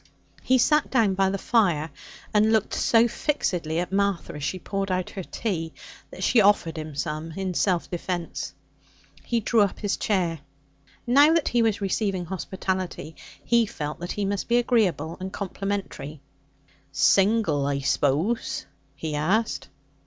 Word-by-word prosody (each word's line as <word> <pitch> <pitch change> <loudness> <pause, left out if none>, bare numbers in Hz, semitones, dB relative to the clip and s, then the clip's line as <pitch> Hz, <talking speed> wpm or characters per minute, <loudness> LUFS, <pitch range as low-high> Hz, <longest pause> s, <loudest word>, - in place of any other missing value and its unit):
He 260 - +3
sat 300 +4 +3
down 225 -7 +3
by 190 0 +2
the 195 - -1
fire, 175 -9 +1 0.4
and 215 +1 +4
looked 220 -3 +1
so 230 0 +4
fixedly 180 - -1
at 175 +1 -2
Martha 200 -3 0
as 150 - -7
she 185 - -1
poured 195 +2 -3
out 185 -1 -1
her 195 - -5
tea 170 -4 -3 0.4
that - - -8
she 235 - +5
offered 195 -5 +3
him 155 -2 -6
some 155 +2 -3
in 190 +1 -3
self 180 -1 +1
defence. 175 -1 -4 0.7
He 235 -1 0
drew 225 +1 +3
up 200 -2 +1
his 205 -2 -1
chair. 175 -6 0 0.7
Now 285 +6 +6
that 330 - +2
he 240 - +2
was 220 -3 +1
receiving 195 -2 -1
hospitality, 185 -2 -4 0.3
he 235 -2 +3
felt 150 -5 -5
that 175 +1 -4
he 205 - -2
must 200 0 -2
be 235 - +3
agreeable 185 - +1
and 190 +1 -5
complimentary. 195 -7 -4 0.7
'Single, 190 -4 +3
I 140 -1 0
suppose?' 145 - 0 0.3
he 155 +2 -4
asked. 155 -2 0
190 Hz, 150 wpm, -25 LUFS, 165-220 Hz, 0.7 s, Now